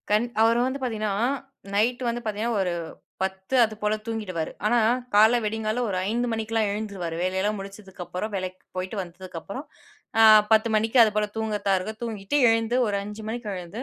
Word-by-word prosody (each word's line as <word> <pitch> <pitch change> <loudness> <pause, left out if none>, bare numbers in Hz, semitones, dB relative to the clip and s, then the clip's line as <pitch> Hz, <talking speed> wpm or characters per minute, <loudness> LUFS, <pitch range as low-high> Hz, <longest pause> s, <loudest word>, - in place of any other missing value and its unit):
கண் 210 +3 +3 0.2
அவரு 230 +1 +4
வந்து 265 +2 -3
பாத்தீங்கன்னா, 215 -4 -1 0.6
நைட்டு 240 +5 +1
வந்து 235 +1 -3
பாத்தீங்கன்னா 220 +2 -1
ஒரு 180 -2 0 0.5
10:00 190 +6 -2
அதுப்போல 215 -1 -1
தூங்கிடுவாரு. 195 -8 -3
ஆனா, 240 +3 +3 0.4
காலைல 220 +4 +6
விடியங்காலைல 220 +2 -1
ஒரு 190 - -2
05:00 240 +2 0
மணிக்கெல்லாம் 225 -1 0
எழுந்துருவாரு. 200 -5 -4
வேலையெல்லாம் 190 +3 0
முடிச்சதுக்கு 195 -1 -9
அப்புறம், 180 +5 -5
வேலைக்கு 185 -1 -5
போய்ட்டு 185 +3 -3
வந்ததுக்கு 180 0 -9
அப்புறம், 255 - -7 0.6
அ - - +8 0.3
10:00 220 +1 +5
மணிக்கு 225 +4 +2
அது 220 -2 +4
போல 210 0 +2
தூங்குறதா 210 -3 0
இருக்கும், 215 +4 -7
தூங்கிட்டு 220 +3 -1
எழுந்து 225 +1 +2
ஒரு 205 -1 0
05:00 210 +1 -8
மணிக்கு 230 -2 -4
எழுந்து 180 +6 -7
215 Hz, 165 wpm, -25 LUFS, 195-225 Hz, 0.6 s, அ